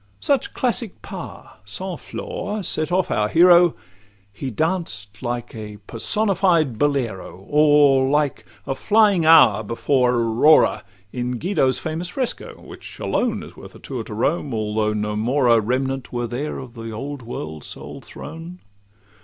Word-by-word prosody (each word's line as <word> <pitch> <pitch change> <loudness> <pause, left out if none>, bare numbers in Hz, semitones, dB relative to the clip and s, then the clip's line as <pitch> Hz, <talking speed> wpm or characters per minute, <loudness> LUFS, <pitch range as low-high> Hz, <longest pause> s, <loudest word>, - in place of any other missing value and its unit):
Such 280 -2 0
classic 240 -4 -1
pas—sans - - -8
flaws—set 210 - -3
off 185 0 +1
our 105 0 +1
hero, 175 +2 +6 0.6
He 130 +6 -5
glanced 110 - -3
like 120 -1 -4
a 105 -2 -8
personified 170 - +1
Bolero; 115 -10 -2
Or, 145 -3 +4
like 145 -1 0 0.2
a 135 - -1
flying 205 0 +3
Hour 110 -10 +7
before 125 +3 +1
Aurora, 120 +6 +4 0.3
In 125 0 -3
Guido's 135 -5 +1
famous 165 +3 -4
fresco 255 +1 -4
which - - -11
alone - - -1
Is - - -12
worth - - -13
a - - -13
tour 130 -4 -5
to - - -8
Rome, 140 +2 -1
although 105 0 -1
no 105 0 -2
more 125 +6 +1
a 115 -1 +5
Remnant 130 +3 -2
were 120 -1 -2
there 125 +6 -4
of 130 -3 -9
the 115 -2 -7
old 135 +5 -6
world's 80 -10 -7
sole - - -9
throne. 165 +2 -10
135 Hz, 140 wpm, -21 LUFS, 115-165 Hz, 0.6 s, Hour